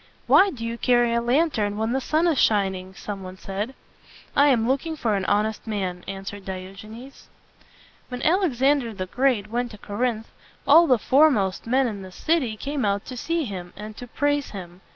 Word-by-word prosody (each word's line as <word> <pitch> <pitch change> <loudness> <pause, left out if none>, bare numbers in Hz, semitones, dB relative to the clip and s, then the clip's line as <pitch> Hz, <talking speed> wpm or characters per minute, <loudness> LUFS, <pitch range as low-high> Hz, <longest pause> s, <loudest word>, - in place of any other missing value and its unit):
"Why 395 - +6
do 235 -10 -6
you 230 0 -4
carry 240 -2 +3
a 235 - +1
lantern 240 -5 +1
when 220 +1 -1
the 265 - 0
sun 310 +5 +1
is 325 -6 +2
shining?" 190 -3 +1
some 200 -1 -6
one 185 0 -9
said. 205 +7 -5 0.6
"I 285 - +5
am 235 -5 +3
looking 280 +5 -1
for 230 -7 -1
an 195 -2 -1
honest 210 +3 0
man," 185 -4 -3
answered 195 +1 -6
Diogenes. 195 +8 -9 0.8
When 250 0 -6
Alexander 280 - +2
the 185 -1 -3
Great 225 -1 0
went 245 +1 -1
to 215 - -11
Cor 205 +1 -8
inth, 235 -3 0 0.4
all 330 +4 +7
the 255 - +5
fore 285 +8 +5
most 195 -6 -1
men 260 +3 +3
in 210 -5 -4
the 190 -1 -10
city 260 - 0
came 280 +3 -3
out 200 -1 0
to 255 - -7
see 330 +6 -1
him 180 -5 -7
and 210 +1 -8
to 245 - -8
praise 290 +3 0
him. 180 -2 -9
230 Hz, 195 wpm, -24 LUFS, 200-270 Hz, 0.8 s, all